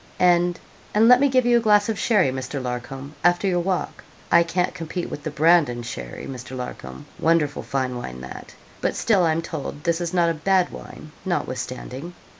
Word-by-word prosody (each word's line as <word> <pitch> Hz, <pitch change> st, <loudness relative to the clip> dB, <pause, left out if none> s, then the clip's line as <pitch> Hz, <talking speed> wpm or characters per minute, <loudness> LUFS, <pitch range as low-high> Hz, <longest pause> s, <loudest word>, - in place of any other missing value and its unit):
'And 175 Hz, -1 st, +3 dB, 0.4 s
and 220 Hz, +2 st, +5 dB
let 250 Hz, +1 st, +8 dB
me 280 Hz, +1 st, +4 dB
give 255 Hz, -1 st, +3 dB
you 240 Hz, 0 st, +5 dB
a -, -, +2 dB
glass 210 Hz, -2 st, +4 dB
of 220 Hz, -3 st, -2 dB
sherry, 205 Hz, -, +3 dB
Mr. 130 Hz, +2 st, -4 dB
Larcom, 130 Hz, +3 st, -5 dB
after 175 Hz, +2 st, +3 dB
your 180 Hz, -2 st, +2 dB
walk. 180 Hz, +1 st, -2 dB, 0.3 s
I -, -, +7 dB
can't 175 Hz, +2 st, 0 dB
compete 170 Hz, +1 st, -5 dB
with 145 Hz, -, -5 dB
the 155 Hz, -, -4 dB
Brandon 150 Hz, -5 st, +3 dB
sherry, -, -, -7 dB
Mr. 130 Hz, 0 st, -7 dB
Larcom. 65 Hz, -, -7 dB
Wonderful 160 Hz, -3 st, +2 dB
fine 130 Hz, -2 st, -2 dB
wine 65 Hz, -, -6 dB
that! 65 Hz, -, -10 dB, 0.3 s
but -, -, 0 dB
still 210 Hz, -5 st, +2 dB
I'm 160 Hz, +1 st, 0 dB
told 150 Hz, -2 st, -6 dB
this 170 Hz, 0 st, 0 dB
is 170 Hz, -1 st, -2 dB
not 170 Hz, -2 st, +3 dB
a -, -, -1 dB
bad 185 Hz, +3 st, +1 dB
wine 155 Hz, -, -10 dB
notwithstanding.' 140 Hz, -1 st, -4 dB
165 Hz, 190 wpm, -23 LUFS, 130-180 Hz, 0.4 s, let